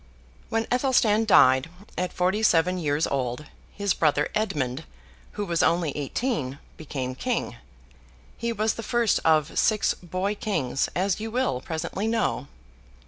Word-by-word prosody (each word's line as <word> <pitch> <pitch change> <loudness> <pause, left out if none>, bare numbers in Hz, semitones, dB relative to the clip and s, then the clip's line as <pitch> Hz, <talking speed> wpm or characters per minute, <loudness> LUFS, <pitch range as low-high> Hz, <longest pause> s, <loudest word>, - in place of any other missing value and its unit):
When 225 0 0
Athelstan 245 -4 +3
died, 130 -8 +5 0.3
at 180 0 -2
forty 185 +4 0
seven 180 -3 +3
years 150 -1 +1
old, 130 +1 -2 0.3
his 200 -1 0
brother 150 -2 +1
Edmund, 150 - -1 0.5
who 205 - -3
was 170 -3 0
only 170 -3 +2
eighteen, 145 - -2 0.2
became 135 -4 -5
king. 180 - -2 0.8
He 235 0 -2
was 220 -1 0
the - - -6
first 235 -1 +1
of 155 -2 +2
six 215 -2 +2
boy 185 +3 -3
kings, 160 - -1
as 190 +2 0
you 220 +1 -4
will 235 - -1
presently 170 +7 -3
know. 225 -10 0
180 Hz, 140 wpm, -25 LUFS, 145-220 Hz, 0.8 s, died